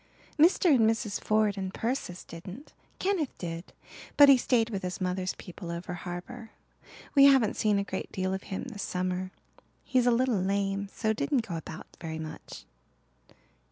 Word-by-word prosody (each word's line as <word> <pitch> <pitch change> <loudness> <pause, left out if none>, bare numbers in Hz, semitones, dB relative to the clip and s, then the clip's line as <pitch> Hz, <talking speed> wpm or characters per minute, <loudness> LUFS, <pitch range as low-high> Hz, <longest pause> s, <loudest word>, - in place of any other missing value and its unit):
"Mr. 335 0 +5
and 225 -4 +5
Mrs. 220 -2 -2
Ford 210 -2 +2
and 190 -1 -3
Persis 225 -6 -3
didn't. 185 - -10 0.2
Kenneth 370 -8 -1
did 170 0 -6 0.5
but 285 -1 +9
he 275 - +10
stayed 235 -2 +1
with 195 -3 -3
his 180 0 -4
mother's 185 0 -2
people 175 0 -9
over 170 +1 -5
harbour. 180 +7 -7 0.6
We 275 -1 +7
haven't 265 -6 +5
seen 210 -2 +2
a 200 - +1
great 190 -1 -5
deal 185 0 -1
of 190 - -3
him 190 - -3
this 230 -6 -7
summer. 185 0 -2 0.5
He's 255 -1 +2
a - - +6
little 240 -4 +2
lame, 195 +1 -1
so 220 0 0
didn't 265 0 0
go 170 - -4
about 160 +1 -8
very 160 -1 -5
much." 160 -1 -8
200 Hz, 165 wpm, -29 LUFS, 180-245 Hz, 0.6 s, he